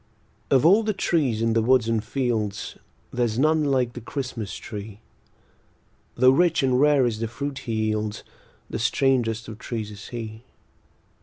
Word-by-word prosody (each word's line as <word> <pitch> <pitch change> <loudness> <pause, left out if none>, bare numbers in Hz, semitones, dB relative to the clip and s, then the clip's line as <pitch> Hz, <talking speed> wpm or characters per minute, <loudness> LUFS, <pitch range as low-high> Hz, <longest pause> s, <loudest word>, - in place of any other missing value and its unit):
Of 135 +2 +4
all 195 +7 +6
the 215 -1 -1
trees 140 - +1
in 115 0 +2
the 115 - +3
woods 120 0 +3
and 115 -2 0
fields 110 -6 -2 0.4
There's 120 -3 0
none 155 +3 +3
like 130 -4 +1
the 120 - -7
Christmas 120 -4 -5
tree; 105 -1 -8 1.2
Tho' 130 +1 +6
rich 165 +1 +3
and 130 0 +2
rare 145 -3 +4
is 115 -3 -1
the 115 - -1
fruit 140 +4 -5
he 115 - -5 0.2
yields, 110 0 -3 0.4
The - - -4
strangest 115 -1 +1
of 110 -1 -9
trees 110 -3 -5
is 100 -1 -10
he. 110 -2 -7
120 Hz, 160 wpm, -24 LUFS, 110-135 Hz, 1.2 s, all